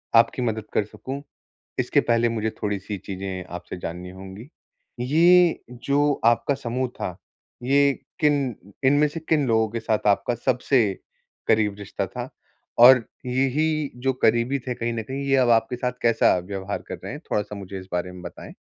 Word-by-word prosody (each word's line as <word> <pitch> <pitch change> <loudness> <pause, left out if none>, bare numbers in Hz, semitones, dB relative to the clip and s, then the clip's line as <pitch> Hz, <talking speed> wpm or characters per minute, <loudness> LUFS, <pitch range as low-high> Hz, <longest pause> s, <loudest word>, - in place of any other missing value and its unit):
आपकी 115 +2 +4
मदद 110 -3 -1
कर - - +2
सकूँ, 135 +6 -7 0.6
इसके - - +3
पहले 120 0 +2
मुझे 110 -1 -1
थोड़ी-सी 100 -1 -3
चीज़ें 95 -1 -5
आपसे 90 +1 -7
जाननी 90 +2 -6
होंगी। 95 +6 -10 0.5
ये 170 +6 +5 0.3
जो 145 +1 +2
आपका 120 +4 +3
समूह 125 0 -2
था, 90 - -3 0.5
ये 140 +2 +4 0.3
किन 140 -5 +2 0.3
इनमें 145 +3 +4
से 160 +2 -6
किन 150 -4 +3
लोगों 110 -1 +2
के 115 - -3
साथ 110 -2 -1
आपका 105 +4 +2
सबसे 125 0 +2 0.6
करीब 105 -2 +3
रिश्ता 100 - -4
था? - - -6 0.5
और 125 0 +8 0.2
यही 140 +4 0
जो 135 - +3
करीबी 120 +4 +3
थे 125 - -2
कहीं 115 0 -2
न 115 - -3
कहीं 135 +5 -5
ये 135 - +3
अब 125 -2 +3
आपके 115 +1 +3
साथ 125 0 -1
कैसा 115 -5 +4
व्यवहार 95 +2 -5
कर - - -4
रहे - - -5
हैं? - - -7
थोड़ा-सा 105 0 -1
मुझे 95 -1 -7
इस 95 - -12
बारे 90 +1 -2
में 90 - -11
बताएँ। - - -9
115 Hz, 170 wpm, -24 LUFS, 105-135 Hz, 0.6 s, और